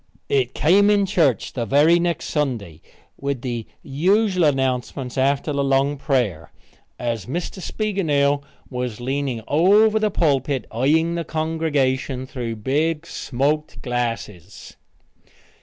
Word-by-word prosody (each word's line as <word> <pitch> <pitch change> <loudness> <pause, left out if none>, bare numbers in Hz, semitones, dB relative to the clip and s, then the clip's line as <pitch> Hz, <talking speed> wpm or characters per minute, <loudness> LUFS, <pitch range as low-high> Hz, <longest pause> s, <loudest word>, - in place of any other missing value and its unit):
It 130 -3 +1
came 200 +6 +4
in 205 -1 +3
church 165 - +1
the 120 - -2
very 155 +8 +5
next 170 -2 -1
Sunday, 115 - -2 0.4
with 140 -3 -2
the 120 -3 -4 0.2
usual 185 +5 +2
announcements 130 -2 -1
after 140 +2 +1
the 140 0 0
long 135 +1 +2
prayer, 120 - -1 0.5
as 120 -4 -3
Mr. 175 +7 -4
Spiegelnail 150 -10 0 0.3
was 125 -4 -4
leaning 130 -2 -2
over 205 +8 +4
the 215 0 +1
pulpit 140 -7 0
eying 155 +8 +2
the 170 0 -2
congregation 145 -5 -1
through 120 -4 -5
big 150 +8 -1
smoked 145 +3 -2
glasses. 115 - -4
140 Hz, 120 wpm, -22 LUFS, 125-165 Hz, 0.5 s, very